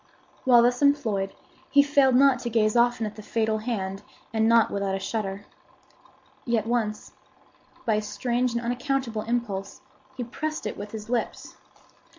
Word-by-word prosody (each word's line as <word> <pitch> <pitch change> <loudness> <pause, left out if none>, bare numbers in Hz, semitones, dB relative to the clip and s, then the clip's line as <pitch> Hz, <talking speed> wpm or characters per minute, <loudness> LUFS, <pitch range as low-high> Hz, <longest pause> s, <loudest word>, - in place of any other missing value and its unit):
While 240 -2 +7
thus 245 +2 +2
employed, 225 -10 +1 0.3
he 285 +1 +6
failed 280 -3 +4
not 270 -1 +5
to 240 - -4
gaze 215 -1 +2
often 240 -1 +3
at 210 0 -6
the 215 - -9
fatal 220 0 -1
hand, 195 -4 -3 0.3
and 220 0 +2
not 230 -1 +4
without 200 -1 -1
a - - -3
shudder. 200 -1 -4 1.0
Yet 230 -3 0
once, 225 -3 -2 0.7
by 225 - +2
a 210 - +1
strange 235 +4 -1
and 235 - -1
unaccountable 245 -1 -1
impulse 215 -4 -3 0.4
he 250 - -2
pressed 305 +5 -4
it 210 - -3
with 205 +1 -7
his 215 0 -8
lips. 240 -1 -3
230 Hz, 160 wpm, -26 LUFS, 210-245 Hz, 1.0 s, While